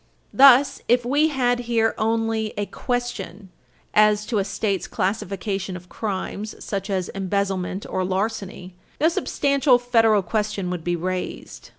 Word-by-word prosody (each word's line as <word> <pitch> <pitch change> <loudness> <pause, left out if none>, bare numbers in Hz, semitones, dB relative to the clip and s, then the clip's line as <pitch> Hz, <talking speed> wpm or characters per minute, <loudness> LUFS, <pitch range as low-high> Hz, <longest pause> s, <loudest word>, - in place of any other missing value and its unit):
Thus, 275 +1 +6
if 245 0 +3
we 290 +5 +3
had 245 -5 +1
here 225 -1 +2
only 225 -1 -1
a 205 - -1
question 210 -6 -4 0.4
as 210 0 +4
to 215 -2 -1
a - - +1
State's 200 -1 -2
classification 195 -1 -3
of 180 0 -15
crimes, 210 0 -4
such 200 0 -5
as 185 -2 -1
embezzlement 195 -1 -2
or 185 - -2
larceny, 190 -1 -3 0.3
no 315 - +4
substantial 280 -5 +2
federal 225 -4 +3
question 205 -1 -2
would 175 -3 -4
be 175 +1 0
raised. 175 - -5
210 Hz, 135 wpm, -23 LUFS, 190-240 Hz, 0.4 s, Thus